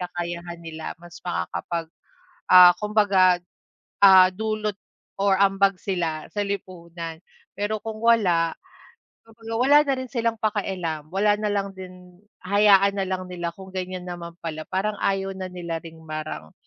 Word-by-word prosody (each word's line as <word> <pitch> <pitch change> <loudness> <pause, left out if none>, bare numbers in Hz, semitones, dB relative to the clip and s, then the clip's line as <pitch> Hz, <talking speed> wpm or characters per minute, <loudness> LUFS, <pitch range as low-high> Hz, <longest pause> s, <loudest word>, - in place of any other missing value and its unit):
kakayahan 175 -1 -5
nila, 160 -1 -8
mas 175 0 -12
makakapag, 170 -1 -3 0.6
ah, 180 -1 +9
kumbaga, 200 -4 +4 0.7
ah, 190 -1 +9
dulot 215 0 -2 0.4
or 195 -1 +3
ambag 195 -1 +3
sila 165 -5 -2
sa 205 - -1
lipunan. 170 -4 -6 0.4
Pero 205 +2 -1
kung 220 -1 -6
wala, 180 -8 +3 1.0
wala 285 +5 +5
na 275 -2 +1
rin 260 - -4
silang 230 -2 -1
pakialam. 185 -8 -2
Wala 205 +2 +3
na 210 - 0
lang 200 -1 -2
din, 180 -1 -12 0.3
hayaan 200 0 +5
na - - +1
lang 185 -1 -3
nila 175 -1 -3
kung 190 -1 -12
ganyan 185 -1 -4
naman 170 -1 -7
pala. 155 -1 -5
Parang 195 +3 -1
ayaw 195 0 0
na 185 -1 -5
nila 170 -2 -5
rin, 165 -1 -12
parang, 155 - -6
185 Hz, 140 wpm, -24 LUFS, 170-200 Hz, 1.0 s, ah